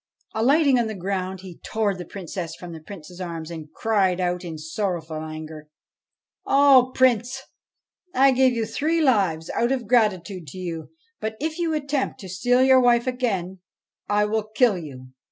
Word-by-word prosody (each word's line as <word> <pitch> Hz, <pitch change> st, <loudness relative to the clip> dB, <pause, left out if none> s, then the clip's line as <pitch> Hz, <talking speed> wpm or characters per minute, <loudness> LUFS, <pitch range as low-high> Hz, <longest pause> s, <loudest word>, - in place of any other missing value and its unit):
Alighting 270 Hz, +3 st, +4 dB
on 235 Hz, -, +1 dB
the 220 Hz, -, -5 dB
ground, 190 Hz, 0 st, -3 dB
he 185 Hz, -3 st, -11 dB
tore 215 Hz, -2 st, 0 dB
the 180 Hz, -1 st, -7 dB
Princess 175 Hz, -3 st, -6 dB
from 175 Hz, -1 st, -9 dB
the 160 Hz, -, -8 dB
Prince's 175 Hz, +1 st, -11 dB
arms, 165 Hz, -2 st, -5 dB
and 155 Hz, -2 st, -8 dB
cried 195 Hz, -3 st, +1 dB
out 180 Hz, 0 st, -1 dB
in 165 Hz, -3 st, -6 dB
sorrowful 160 Hz, 0 st, -3 dB
anger, 155 Hz, -1 st, -8 dB, 0.4 s
' -, -, -65 dB
O 275 Hz, -2 st, +6 dB
Prince, 255 Hz, +1 st, +2 dB, 0.7 s
I 270 Hz, -1 st, +5 dB
gave 260 Hz, 0 st, +4 dB
you 230 Hz, -2 st, -1 dB
three 305 Hz, +9 st, 0 dB
lives 195 Hz, -, +2 dB
out 235 Hz, +2 st, 0 dB
of 250 Hz, -5 st, -1 dB
gratitude 195 Hz, -7 st, +1 dB
to 140 Hz, -, -9 dB
you, 170 Hz, -3 st, -5 dB, 0.3 s
but, 220 Hz, 0 st, -4 dB
if 315 Hz, +3 st, -3 dB
you 330 Hz, -2 st, 0 dB
attempt 280 Hz, -2 st, -2 dB
to 190 Hz, -, -9 dB
steal 245 Hz, +8 st, +2 dB
your 260 Hz, 0 st, +6 dB
wife 240 Hz, -1 st, +4 dB
again, 200 Hz, -8 st, -2 dB, 0.5 s
I 205 Hz, 0 st, +3 dB
will 220 Hz, +1 st, 0 dB
kill 240 Hz, -5 st, +4 dB
you.' 135 Hz, -7 st, -9 dB
200 Hz, 170 wpm, -24 LUFS, 175-250 Hz, 0.7 s, O